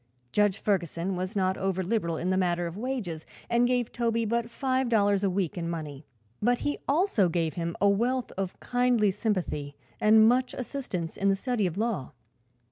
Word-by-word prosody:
Judge 205 -2 +2
Ferguson 185 -2 -1
was 185 +4 -4
not 190 -1 +1
over 190 -1 0
liberal 175 -5 -1
in 180 +3 -1
the - - +2
matter 175 -2 +1
of 170 0 -5
wages 210 -9 -4 0.3
and 240 +1 +4
gave 245 -2 0
Toby 230 -1 0
but 235 +1 -1
five 260 0 0
dollars 205 -3 +3
a 195 - +3
week 185 -2 -1
in 170 0 -3
money; 155 -4 -6 0.3
but 245 +3 +3
he 290 - -1
also 280 - +3
gave 165 -1 0
him 170 -1 -3
a 200 - +4
wealth 240 +6 +1
of 190 -1 -4
kindly 245 -4 +2
sympathy 185 -9 -2 0.2
and 220 +1 +6
much 255 +2 +2
assistance 235 - -4
in 200 - +2
the 195 - +3
study 220 -1 0
of 175 +1 -5
law. 210 - -2
200 Hz, 185 wpm, -28 LUFS, 175-235 Hz, 0.3 s, and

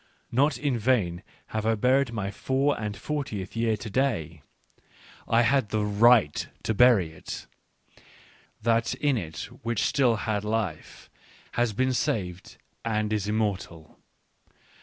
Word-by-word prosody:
Not 140 +4 +2
in 140 -5 -1
vain 105 -8 +1 0.3
have 110 -1 -1
I 110 +1 +2
buried 130 +3 +2
my 105 -4 -3
four 135 +6 0
and 105 -1 -4
fortieth 135 -12 -4
year 115 -1 +1
to 105 - -8
day; 95 - -1 0.9
I 115 +1 +4
had 130 -2 +2
the 105 0 0
right 105 -5 +4 0.2
to 110 - 0
bury 110 -8 +5
it 80 - -8 0.6
— - - -27
that 115 0 +2
in 145 -2 +1
it 85 -7 -4 0.2
which 115 -1 -1
still 130 -5 +3
had 105 -1 -2
life, 105 -7 -3 0.4
has 120 -1 +1
been 130 +4 +1
saved 95 - -2 0.3
and 110 -1 -1
is 105 -2 -1
immortal. 100 -7 -3
110 Hz, 140 wpm, -27 LUFS, 100-125 Hz, 0.9 s, bury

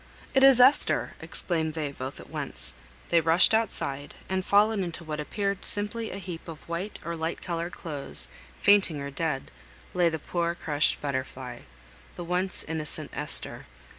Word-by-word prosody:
"It 270 - +4
is 270 -2 +8
Esther!" 260 +4 +5
exclaimed 160 -3 +2
they, 150 -3 -2
both 130 0 -7
at - - -11
once. - - -5 0.4
They 170 -1 +4
rushed 165 +6 +4
outside; 145 -10 -1
and, 190 0 -1
fallen 205 +1 +3
into 170 -1 -4
what 155 -1 -5
appeared 200 +5 -2
simply 210 +2 +1
a - - -6
heap 180 -4 -7
of 160 -3 -10
white 170 +5 -4
or 170 0 -3
light 160 +1 -3
coloured 170 0 -3
clothes, 140 - -6 0.3
fainting 195 -7 +4
or 140 0 -5
dead, 145 -2 -2 0.4
lay 175 -2 +3
the 160 - -3
poor 170 +2 -2
crushed 150 -3 +1
Butterfly 130 -3 -4 0.6
the 175 - -6
once 180 +2 0
innocent 155 -2 -2
Esther. - - -2
170 Hz, 160 wpm, -27 LUFS, 150-190 Hz, 0.6 s, is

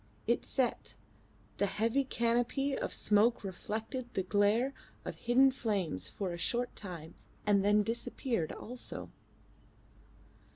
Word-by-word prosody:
It - - +2
set: 260 -3 -1 0.6
the 200 - +2
heavy 230 +7 +1
canopy 245 +3 +1
of - - -2
smoke 215 +3 +3
reflected 220 +6 -4
the 190 - +1
glare 205 +7 +3 0.3
of - - -3
hidden 260 +3 +4
flames 200 - -1
for 190 -4 -3
a 170 - -6
short 245 +6 -1
time 170 -5 -7 0.3
and 200 -2 +4
then 210 +1 +5
disappeared 230 - -1
also. 245 +2 -5
225 Hz, 120 wpm, -33 LUFS, 200-245 Hz, 0.6 s, then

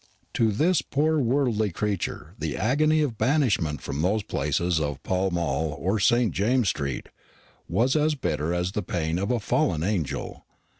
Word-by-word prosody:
To 110 -2 +2
this 160 - +2
poor 155 +2 +1
worldly 120 -5 +1
creature 90 -4 -3
the 80 -2 -3
agony 155 - +2
of 120 -7 -3
banishment 110 - +1
from 70 +2 -3
those 100 +5 +1
palaces 85 -3 0
of 75 -2 -3
Pall 95 +1 0
Mall 80 -3 -1
or 95 +8 0
St. 120 +1 +3
James's 115 +2 +2
street 70 -3 -3 0.6
was 130 +5 +2
as 155 0 +2
bitter 80 - -2
as 90 +1 -1
the 105 - -2
pain 85 -2 -2
of 100 - -2
a 125 -1 +1
fallen 85 -6 0
angel. 85 -8 -3
100 Hz, 160 wpm, -25 LUFS, 80-125 Hz, 0.6 s, St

